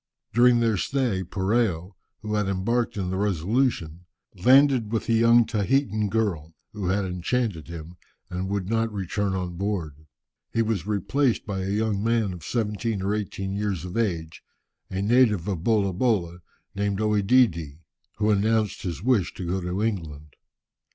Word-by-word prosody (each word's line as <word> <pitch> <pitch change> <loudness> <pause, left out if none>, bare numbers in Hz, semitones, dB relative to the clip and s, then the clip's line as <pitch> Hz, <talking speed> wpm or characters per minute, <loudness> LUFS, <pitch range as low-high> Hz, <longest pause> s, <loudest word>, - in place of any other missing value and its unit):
During 120 +1 +5
their 115 -3 +2
stay, 120 -6 0
Poreo, 95 -1 0 0.3
who 105 0 -3
had 105 -2 +1
embarked 105 +5 -1
in 90 -2 -2
the 95 - -2
Resolution, 95 - 0 0.3
landed 130 +2 +4
with 115 - -1
a 115 - +2
young 115 +1 +5
Tahitan 110 -1 0
girl, 90 -8 -1 0.2
who 100 -4 -4
had 95 +2 +1
enchanted 90 0 -2
him, 85 +1 -9 0.3
and 90 +1 -4
would 100 -2 -2
not 115 +1 0
return 100 0 -2
on 90 -2 -4
board. 80 -7 -4 0.4
He 115 - +1
was 110 -5 -2
replaced 115 +5 0
by 100 -2 -3
a 95 - -3
young 105 0 0
man 115 -4 +1
of 85 -3 -10
seventeen 110 -2 -2
or 100 +2 0
eighteen 95 -2 -3
years 100 -4 -2
of 90 - -7
age, 85 -8 -2 0.5
a 95 +1 -2
native 110 -5 +3
of 90 -5 -3
Bolabola, 100 -4 +1 0.3
named 100 0 -1
OEdidi, 105 - +2 0.4
who 105 0 +1
announced 105 +1 +1
his 85 -2 -5
wish 115 -8 +1
to 90 - -5
go 95 +2 -1
to 90 +4 -2
England. 75 -9 -4
100 Hz, 155 wpm, -25 LUFS, 90-115 Hz, 0.5 s, During